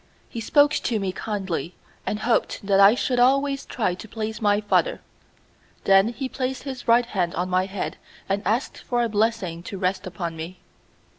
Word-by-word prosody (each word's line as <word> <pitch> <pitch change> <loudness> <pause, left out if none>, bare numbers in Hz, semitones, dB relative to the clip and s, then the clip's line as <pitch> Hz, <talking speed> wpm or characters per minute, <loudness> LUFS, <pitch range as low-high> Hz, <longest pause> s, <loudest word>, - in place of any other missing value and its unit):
He 230 - -6
spoke 290 +6 +4
to 230 -6 0
me 195 -2 -1
kindly, 190 -4 -4 0.3
and 210 - -2
hoped 230 -3 0
that 195 -1 +3
I 200 +3 +8
should 250 0 0
always 275 +2 +2
try 210 -7 0
to 185 +4 -9
please 220 0 -5
my 205 -1 +3
father. 355 - +1 0.8
Then 195 +1 +5
he 260 +3 -3
placed 260 0 -3
his 265 -3 -7
right 235 +1 +5
hand 180 -7 -1
on 180 +2 -1
my 185 +1 +2
head 195 -1 -4 0.3
and 195 +1 0
asked 225 +7 -1
for 240 -1 -1
a 235 - 0
blessing 210 -6 0
to 195 +3 -7
rest 185 0 -1
upon 170 -3 -4
me. 165 +3 -7
210 Hz, 180 wpm, -24 LUFS, 190-240 Hz, 0.8 s, I